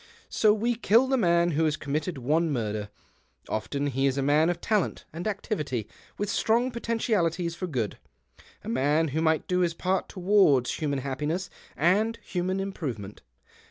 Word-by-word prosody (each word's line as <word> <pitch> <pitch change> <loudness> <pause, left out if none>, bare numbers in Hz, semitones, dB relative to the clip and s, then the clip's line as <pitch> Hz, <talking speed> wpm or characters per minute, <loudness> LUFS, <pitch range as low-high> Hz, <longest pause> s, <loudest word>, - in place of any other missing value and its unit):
So 215 - +4
we 225 +3 +1
kill 230 +2 +4
the 265 0 +1
man 170 -6 +3
who 160 +1 +1
has 155 -1 +1
committed 155 +3 -3
one 155 +6 +1
murder. 105 -5 -2 0.6
Often 140 +6 -2
he 135 +2 +2
is 135 0 0
a 135 - 0
man 150 +4 +3
of 175 -1 -1
talent 210 -2 -1
and 170 +5 -4
activity; 150 - -3 0.3
with 205 - -2
strong 235 +5 +1
potentialities 205 -8 0
for 180 +2 -4
good, 120 - -3 0.6
a - - -10
man 145 +6 +2
who 155 +4 -1
might 160 -1 +1
do 180 0 +1
his 170 -2 +1
part 185 +2 -1
towards 180 -10 +3
human 145 -3 -1
happiness 150 +7 -3 0.3
and 210 +8 +2
human 185 +1 -2
improvement. 130 - -5
170 Hz, 160 wpm, -27 LUFS, 140-195 Hz, 0.6 s, So